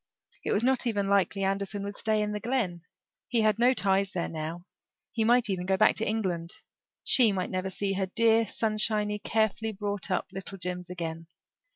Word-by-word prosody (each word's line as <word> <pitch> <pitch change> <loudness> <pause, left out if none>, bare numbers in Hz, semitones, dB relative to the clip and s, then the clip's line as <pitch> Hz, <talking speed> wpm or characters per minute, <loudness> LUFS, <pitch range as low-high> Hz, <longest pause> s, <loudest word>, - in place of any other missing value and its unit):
It - - -2
was 210 - +1
not 260 0 +2
even 200 -4 0
likely 200 0 +2
Anderson 195 +1 -2
would 200 0 -5
stay 215 -1 0
in 210 - -2
the 210 - -3
Glen; 215 -8 -1 0.5
he 235 -2 +1
had 215 0 +2
no 245 +2 +5
ties 195 -2 +1
there 175 - -2
now; 165 +2 -5 0.5
he 225 - 0
might 240 +1 +4
even 185 -3 -2
go 190 0 +2
back 215 - +5
to 225 - 0
England. 180 -6 -2 0.5
She 240 -5 +5
might 185 -2 -2
never 185 0 -2
see 195 +1 -2
her 190 0 -1
dear, 225 +2 +3
sunshiny, 215 -1 0
carefully 220 +1 0
brought 205 0 -3
up 185 - 0
little 195 +1 -3
Jims 180 -1 -5
again. 165 -2 -5
200 Hz, 190 wpm, -28 LUFS, 185-220 Hz, 0.5 s, no